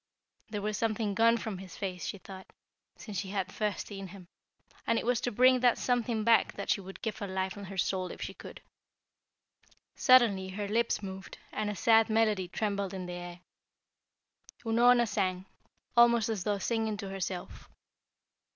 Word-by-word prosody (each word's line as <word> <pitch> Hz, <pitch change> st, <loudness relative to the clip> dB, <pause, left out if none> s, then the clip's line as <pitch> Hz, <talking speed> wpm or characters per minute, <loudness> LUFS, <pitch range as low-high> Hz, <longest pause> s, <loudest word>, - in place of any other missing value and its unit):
There 210 Hz, -2 st, -4 dB
was 210 Hz, -1 st, -2 dB
something 215 Hz, -2 st, 0 dB
gone 230 Hz, +3 st, +4 dB
from 215 Hz, -4 st, -5 dB
his 185 Hz, -2 st, -10 dB
face, 185 Hz, -2 st, -4 dB
she -, -, -4 dB
thought, 190 Hz, 0 st, -11 dB, 0.5 s
since 205 Hz, -4 st, -6 dB
she 190 Hz, -, -5 dB
had 190 Hz, -2 st, -2 dB
first 210 Hz, -2 st, -2 dB
seen 195 Hz, -2 st, -7 dB
him, 185 Hz, -1 st, -13 dB, 0.6 s
and 230 Hz, -, +3 dB
it -, -, -2 dB
was 245 Hz, 0 st, +1 dB
to 245 Hz, -, -1 dB
bring 255 Hz, +3 st, +5 dB
that 245 Hz, -1 st, +4 dB
something 240 Hz, -3 st, 0 dB
back 230 Hz, +1 st, +4 dB
that 200 Hz, -, -3 dB
she 200 Hz, -, +1 dB
would 195 Hz, +1 st, -11 dB
give 215 Hz, -1 st, -3 dB
her 200 Hz, -, -4 dB
life 190 Hz, 0 st, -2 dB
and 200 Hz, -2 st, -8 dB
her 195 Hz, +1 st, -8 dB
soul 185 Hz, 0 st, 0 dB
if -, -, -9 dB
she -, -, -5 dB
could. -, -, -11 dB, 1.3 s
Suddenly 230 Hz, -8 st, +5 dB
her 200 Hz, +2 st, -4 dB
lips 225 Hz, 0 st, 0 dB
moved 190 Hz, -1 st, -8 dB
and 215 Hz, -1 st, -2 dB
a 210 Hz, -, -3 dB
sad 225 Hz, +3 st, +4 dB
melody 215 Hz, -4 st, +2 dB
trembled 200 Hz, 0 st, -2 dB
in 185 Hz, -1 st, -5 dB
the 180 Hz, -, -6 dB
air. 175 Hz, 0 st, -7 dB, 1.3 s
Unorna 240 Hz, +1 st, +5 dB
sang, 190 Hz, -3 st, -1 dB, 0.5 s
almost 235 Hz, -1 st, +5 dB
as 210 Hz, -5 st, -2 dB
though 205 Hz, -1 st, +1 dB
singing 220 Hz, +1 st, -1 dB
to 200 Hz, -1 st, -6 dB
herself. 190 Hz, -2 st, -5 dB
205 Hz, 180 wpm, -30 LUFS, 190-225 Hz, 1.3 s, bring